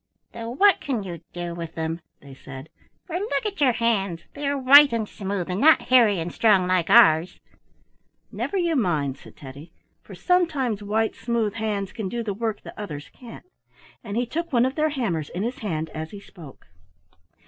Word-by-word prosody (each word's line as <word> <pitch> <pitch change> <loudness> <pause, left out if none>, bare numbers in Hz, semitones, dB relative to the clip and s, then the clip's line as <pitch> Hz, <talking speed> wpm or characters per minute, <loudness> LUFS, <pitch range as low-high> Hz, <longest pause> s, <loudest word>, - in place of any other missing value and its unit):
"Though 230 0 -6
what 390 +11 +3
can 255 -8 -2
you 170 -4 -7
do 175 -1 -5
with 170 -1 -7
them?" 160 +1 -3 0.2
they 140 -1 -13
said, 135 +2 -11 0.4
"for 350 0 -4
look 435 +3 -2
at 405 -6 -4
your 260 -4 +4
hands; 200 -7 0
they 285 0 -4
are 285 0 0
white 280 +2 +7
and 225 -2 -2
smooth, 195 -4 -4
and 185 +3 -3
not 315 +1 +7
hairy 235 -6 +4
and 165 +1 -5
strong 205 -5 +3
like 180 -2 0
ours." 160 +3 +5 0.9
"Never 400 - -3
you 340 -3 +1
mind," 155 - 0
said - - -16
Teddy, 140 +4 -11 0.3
"for - - -12
sometimes 300 - 0
white, 220 +2 0
smooth 225 -3 -2
hands 210 -3 -3
can 215 -5 -4
do 235 +2 -3
the 210 -3 -3
work 220 +1 -4
that - - -10
others 150 -9 -7
can't," 240 -3 -13 0.6
and 210 -1 -5
he 245 - +1
took 335 +8 -4
one 245 -2 +3
of 260 - -1
their 310 +1 +1
hammers 200 - -2
in 180 +3 -4
his 240 +3 -4
hand 160 -7 -4
as 160 0 -6
he 205 - -10
spoke. 165 -8 -14
215 Hz, 190 wpm, -24 LUFS, 170-255 Hz, 0.9 s, white